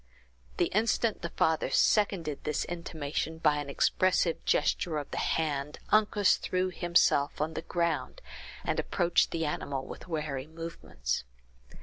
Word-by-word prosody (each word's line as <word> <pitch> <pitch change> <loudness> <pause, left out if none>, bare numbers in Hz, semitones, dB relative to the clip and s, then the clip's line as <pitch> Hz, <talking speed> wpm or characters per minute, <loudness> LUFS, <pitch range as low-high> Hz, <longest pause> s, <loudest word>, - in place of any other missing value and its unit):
The 175 - +3
instant 220 +1 +1
the 170 - -3
father 160 0 +1
seconded 185 -8 +2
this 150 -1 -1
intimation 160 -2 -4
by 150 -2 +3
an 145 -1 -4
expressive 180 +3 +2
gesture 160 -3 +1
of 145 - -5
the - - -2
hand, 150 -2 -1
Uncas 210 -2 +4
threw 185 0 -1
himself 170 -5 +2
on 155 +2 -1
the - - -3
ground, 170 - -1 0.4
and - - -1
approached 175 -2 +2
the 165 -1 -2
animal 140 -2 -3
with - - -9
wary 150 -5 -3
movements. 160 - -4
160 Hz, 135 wpm, -30 LUFS, 150-175 Hz, 0.4 s, Uncas